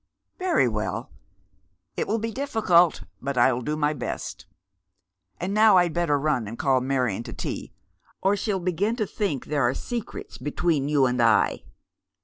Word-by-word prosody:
" - - -60
Very 360 - +2
well. 110 -2 -3 0.8
It - - -2
will 220 - +1
be 225 +1 -3
difficult, 210 - +2 0.2
but 140 0 -3
I'll 125 0 +3
do 150 +5 -2
my 150 0 +1
best. 125 -5 -6 0.9
And 185 +3 -2
now 215 -2 +6
I'd 175 -2 +3
better 170 -4 +1
run 140 -6 0
and 115 +3 -7
call 130 -2 +2
Marion 125 -6 0
to - - -8
tea, - - -5 0.5
or 195 +1 +2
she'll 205 -1 -1
begin 185 +5 0
to 220 -3 -1
think 195 - -2
there 150 -1 -1
are 120 +1 +2
secrets 240 -3 -6
between 145 +1 0
you 145 -3 +4
and 125 -1 +1
I." 115 -2 +3
150 Hz, 165 wpm, -25 LUFS, 130-200 Hz, 0.9 s, now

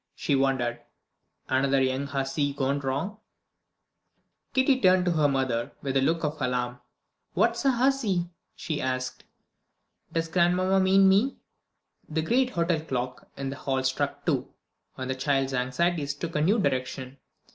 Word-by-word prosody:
she 145 - 0
wondered. 130 -3 +1 0.7
"Another 135 +1 +2
young 130 +1 0
hussy 140 +1 -1
gone 140 0 0
wrong?" 140 +10 -3 1.4
Kitty 260 0 +3
turned 185 -1 +5
to 180 - +2
her 155 -3 +3
mother 130 -4 -1
with 135 -1 -2
a 135 - +4
look 165 +5 +1
of 150 0 -2
alarm. 125 -1 -1 0.6
"What's 235 +3 +2
a - - +6
hussy?" 235 -9 +1 0.2
she 155 -2 -3
asked. 130 0 -3 0.9
"Does 165 0 -1
grandmamma 180 +3 +2
mean 190 +1 +5
me?" 205 +8 +3 0.7
The 160 0 -1
great 250 +8 +2
hotel 170 -5 0
clock 125 -4 -4
in 135 -1 -3
the 140 - -6
hall 135 -2 -1
struck 135 +2 -1
two, - - 0 0.5
and 130 - -4
the 130 - 0
child's 135 0 0
anxieties 140 +4 0
took 165 +3 -5
a 150 - +2
new 195 +9 +3
direction. 130 - -2
145 Hz, 145 wpm, -27 LUFS, 130-180 Hz, 1.4 s, a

